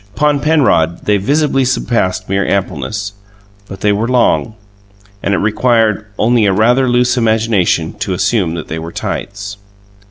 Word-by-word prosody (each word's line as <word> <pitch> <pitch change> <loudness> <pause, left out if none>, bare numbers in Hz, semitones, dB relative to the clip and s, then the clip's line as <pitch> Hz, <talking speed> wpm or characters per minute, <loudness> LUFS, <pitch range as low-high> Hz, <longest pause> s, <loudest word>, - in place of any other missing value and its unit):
Upon 150 -1 +2
Penrod 135 - +1
they 105 -1 +3
visibly 140 +6 +1
surpassed 120 -6 -1
mere 95 +1 0
ampleness; 100 +1 -2 0.5
but 95 0 -10
they 105 - +2
were 105 +3 0
long, 120 -2 +1 0.7
and 100 - 0
it - - 0
required 110 -1 +1
only 115 -1 +2
a - - +3
rather 125 +6 +3
loose 125 +1 +2
imagination 110 -8 +1
to 100 -2 -2
assume 95 -3 0
that 85 - -6
they 80 - -4
were 80 +1 -7
tights. 100 +2 -5
105 Hz, 150 wpm, -14 LUFS, 95-125 Hz, 0.7 s, they